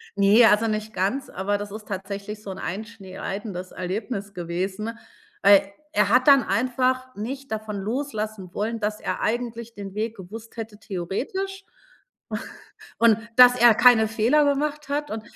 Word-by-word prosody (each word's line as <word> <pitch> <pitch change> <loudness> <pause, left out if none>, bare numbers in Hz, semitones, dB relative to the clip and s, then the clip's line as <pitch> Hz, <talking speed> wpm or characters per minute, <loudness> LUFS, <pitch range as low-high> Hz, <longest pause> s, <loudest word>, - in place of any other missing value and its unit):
Ne, 205 +4 +6
also 215 +1 +4
nicht 215 0 -3
ganz, 200 +9 -1
aber 200 +2 -1
das 205 -1 -6
ist 215 0 -9
tatsächlich 200 +2 -6
so 195 - -6
'n - - -7
einschneidendes 195 -2 -6
Erlebnis 200 +2 -4
gewesen, 190 +6 -4 0.5
weil 200 0 +6 0.2
er 205 -1 +3
hat 250 +4 +4
dann 275 -3 +7
einfach 255 +2 0
nicht 265 +5 -6
davon 215 -1 -4
loslassen 215 -4 -4
wollen, 225 +2 -2
dass 210 0 -2
er - - -3
eigentlich 235 0 -2
den 195 -1 -7
Weg 220 +1 -2
gewusst 220 +5 -10
hätte 220 -2 -6
theoretisch 255 - -4
u - - -38 1.4
und 225 -1 +5 0.2
dass 250 0 +9
er 235 -2 +7
keine 230 -2 +6
Fehler 235 +7 +3
gemacht 290 +1 -1
hat. 295 +1 -2
Und 220 0 -4
220 Hz, 150 wpm, -24 LUFS, 200-245 Hz, 1.4 s, dass